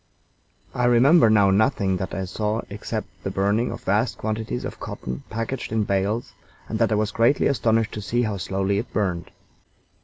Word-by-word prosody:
I 125 Hz, -, 0 dB
remember 120 Hz, +3 st, +6 dB
now 100 Hz, -2 st, +5 dB
nothing 100 Hz, -2 st, +2 dB
that 95 Hz, 0 st, -4 dB
I 95 Hz, -, -2 dB
saw 105 Hz, +4 st, -2 dB
except 105 Hz, +1 st, -4 dB, 0.2 s
the 95 Hz, -, -2 dB
burning 100 Hz, +5 st, +1 dB
of 115 Hz, -, -7 dB
vast 105 Hz, +5 st, +1 dB
quantities 110 Hz, +2 st, -3 dB
of -, -, -7 dB
cotton 65 Hz, +1 st, -6 dB
packed 115 Hz, +3 st, -4 dB
in 110 Hz, -1 st, +1 dB
bales, 100 Hz, +4 st, -1 dB, 0.3 s
and -, -, -3 dB
that -, -, +2 dB
I -, -, +3 dB
was 105 Hz, 0 st, 0 dB
greatly 115 Hz, +6 st, +3 dB
astonished 115 Hz, -4 st, +2 dB
to 105 Hz, -, -5 dB
see 120 Hz, +4 st, 0 dB
how 105 Hz, -3 st, -2 dB
slowly 95 Hz, +2 st, -1 dB
it 115 Hz, -, -6 dB
burned. 90 Hz, -4 st, -1 dB
110 Hz, 180 wpm, -24 LUFS, 100-115 Hz, 0.3 s, remember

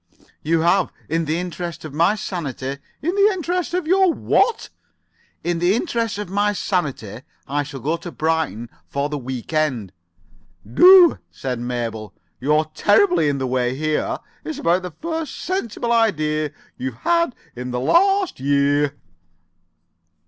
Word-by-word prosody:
"You 160 Hz, +1 st, +1 dB
have. 175 Hz, +2 st, +2 dB, 0.2 s
In 165 Hz, +1 st, 0 dB
the 155 Hz, +2 st, -1 dB
interest 175 Hz, -2 st, -5 dB
of 155 Hz, -, -8 dB
my 170 Hz, +7 st, +3 dB
sanity——" 140 Hz, -, -4 dB, 0.2 s
"In 345 Hz, +4 st, 0 dB
the 400 Hz, +1 st, +5 dB
interests 355 Hz, -1 st, -2 dB
of 360 Hz, -3 st, -1 dB
your 375 Hz, +2 st, +4 dB
what?" 450 Hz, +7 st, +1 dB, 0.7 s
"In 175 Hz, -1 st, -1 dB
the 175 Hz, +4 st, +3 dB
interests 230 Hz, -, -1 dB
of 210 Hz, -, -4 dB
my 205 Hz, +3 st, +1 dB
sanity 140 Hz, -, -2 dB, 0.3 s
I 145 Hz, +1 st, 0 dB
shall 140 Hz, -2 st, -7 dB
go 155 Hz, +6 st, 0 dB
to 170 Hz, +1 st, -8 dB
Brighton 160 Hz, -9 st, -1 dB, 0.2 s
for 140 Hz, +1 st, -2 dB
the 150 Hz, -1 st, -3 dB
week 130 Hz, +2 st, -6 dB
end." 130 Hz, -, 0 dB, 0.7 s
"Do," 355 Hz, -, +7 dB
said 125 Hz, -3 st, -4 dB
Mabel. 115 Hz, -3 st, -4 dB, 0.2 s
"You're 150 Hz, +4 st, +2 dB
terribly 360 Hz, -, +3 dB
in 140 Hz, -, -1 dB
the 135 Hz, -, -2 dB
way 125 Hz, 0 st, 0 dB
here. 155 Hz, +2 st, -1 dB, 0.3 s
It's 155 Hz, -, -5 dB
about 175 Hz, +2 st, +2 dB
the 180 Hz, -, -5 dB
first 320 Hz, -, -5 dB
sensible 240 Hz, -, -2 dB
idea 155 Hz, -10 st, +1 dB, 0.3 s
you've 130 Hz, -2 st, -4 dB
had 335 Hz, -6 st, +2 dB, 0.2 s
for 125 Hz, -, -6 dB
this 125 Hz, 0 st, -5 dB
last 370 Hz, -, +2 dB
year." 145 Hz, +1 st, +1 dB
160 Hz, 150 wpm, -21 LUFS, 140-230 Hz, 0.7 s, Do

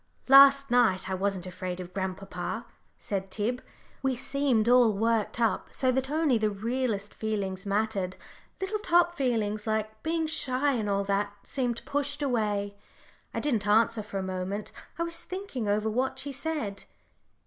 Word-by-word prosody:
"Last 275 Hz, 0 st, +8 dB
night 205 Hz, -6 st, +3 dB
I -, -, 0 dB
wasn't 190 Hz, -1 st, -1 dB
afraid 185 Hz, 0 st, -5 dB
of 180 Hz, 0 st, -8 dB
grandpapa," 190 Hz, +3 st, -4 dB, 0.3 s
said 195 Hz, -1 st, -3 dB
Tib; 225 Hz, +6 st, -2 dB, 0.4 s
"we 265 Hz, -1 st, +1 dB
seemed 260 Hz, -3 st, +1 dB
all 245 Hz, -2 st, +6 dB
worked 225 Hz, +2 st, 0 dB
up, 230 Hz, -2 st, +1 dB
so 260 Hz, -1 st, +1 dB
that 265 Hz, +1 st, 0 dB
only 300 Hz, -5 st, +2 dB
the 215 Hz, 0 st, +2 dB
realest 215 Hz, 0 st, -2 dB
feelings 200 Hz, -3 st, -3 dB
mattered. 200 Hz, -2 st, 0 dB, 0.4 s
Little 385 Hz, +3 st, -2 dB
top 345 Hz, -3 st, +3 dB
feelings, 220 Hz, -6 st, -1 dB
like 215 Hz, 0 st, -2 dB
being 325 Hz, 0 st, 0 dB
shy 285 Hz, -3 st, +1 dB
and 220 Hz, -5 st, -1 dB
all 200 Hz, 0 st, +1 dB
that, 200 Hz, +1 st, 0 dB
seemed 245 Hz, -4 st, -2 dB
pushed 290 Hz, +1 st, -2 dB
away." 210 Hz, -6 st, 0 dB, 0.6 s
I -, -, -3 dB
didn't 230 Hz, -8 st, 0 dB
answer 225 Hz, +1 st, +3 dB
for 200 Hz, -1 st, -6 dB
a 190 Hz, -, -2 dB
moment. 190 Hz, +2 st, -4 dB, 0.3 s
I 335 Hz, -, 0 dB
was 335 Hz, 0 st, -3 dB
thinking 365 Hz, -, -5 dB
over 210 Hz, +1 st, +1 dB
what 255 Hz, +4 st, 0 dB
she 280 Hz, +2 st, -4 dB
said. 270 Hz, -8 st, -3 dB
220 Hz, 160 wpm, -28 LUFS, 200-270 Hz, 0.6 s, Last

